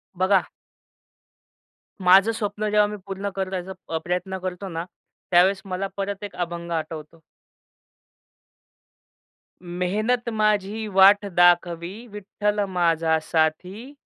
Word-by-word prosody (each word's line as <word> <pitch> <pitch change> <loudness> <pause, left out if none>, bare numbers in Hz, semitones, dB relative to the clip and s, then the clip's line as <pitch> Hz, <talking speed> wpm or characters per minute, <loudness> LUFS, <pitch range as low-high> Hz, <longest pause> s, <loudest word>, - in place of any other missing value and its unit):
बघा 185 +1 +2 1.6
माझं 195 +4 +6
स्वप्न 215 -1 -3
जेव्हा 210 0 +4
मी 210 - -6
पूर्ण 195 +1 -4
करायचा 190 -1 -4 0.2
अ, - - +2
प्रयत्न 180 +2 -2
करतो 185 +1 -5
ना 165 0 -4 0.5
त्यावेळेस 185 +2 +4
मला 195 +1 -3
परत 200 0 -4
एक 205 - -7
अभंग 170 0 -8
आठवतो. 160 0 -5 2.4
मेहनत 205 +8 -1
माझी 215 +1 0
वाट 200 +2 +7
दाखवी, 175 -1 +3 0.2
विठ्ठल 210 0 -2
माझा 165 -2 +2
साथी, 180 - -1
190 Hz, 100 wpm, -23 LUFS, 175-205 Hz, 2.4 s, वाट